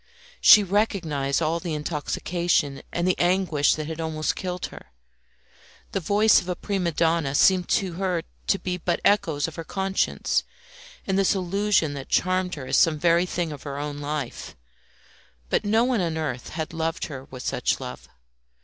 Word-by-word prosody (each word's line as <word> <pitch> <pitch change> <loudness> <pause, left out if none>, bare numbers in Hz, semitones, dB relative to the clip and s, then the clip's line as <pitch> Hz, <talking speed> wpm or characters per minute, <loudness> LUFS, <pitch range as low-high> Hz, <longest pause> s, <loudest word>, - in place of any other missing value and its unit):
She 210 - +8
recognised 170 -8 0
all 160 +2 0
the 170 -3 -4
intoxication 150 -1 -1
and 175 +1 -1
the 185 - +1
anguish 175 -5 +2
that 155 - -4
had 160 +1 -5
almost 155 -1 -1
killed 180 -1 -4
her. - - -12 1.0
The - - -1
voice 205 +5 +4
of 180 - -9
a 180 - -1
prima 185 -2 -2
donna 160 -3 +1
seemed 185 +3 +4
to 190 -3 +1
her 180 -2 -1 0.2
to 195 - +3
be 180 -2 -3
but 175 0 -1
echoes 165 -8 +2
of 165 - -9
her 165 - -4
conscience, 190 +3 0 0.6
and 190 0 +1
this 195 +1 +3
illusion 190 -3 +1
that 135 -2 -7
charmed 185 0 +1
her 140 -4 -7
as - - +1
some 160 -2 +4
very 170 +3 +3
thing 175 -3 -2
of 145 - -8
her 140 -1 -6
own 145 0 -4
life. 145 -3 -5 1.0
But - - +1
no 220 +3 +3
one 245 -4 +1
on 165 -2 -1
earth 130 -6 -4
had 160 0 -5
loved 165 0 -2
her 135 -3 -8
with 130 -1 -9
such - - 0
love. - - -8
170 Hz, 175 wpm, -25 LUFS, 150-185 Hz, 1.0 s, She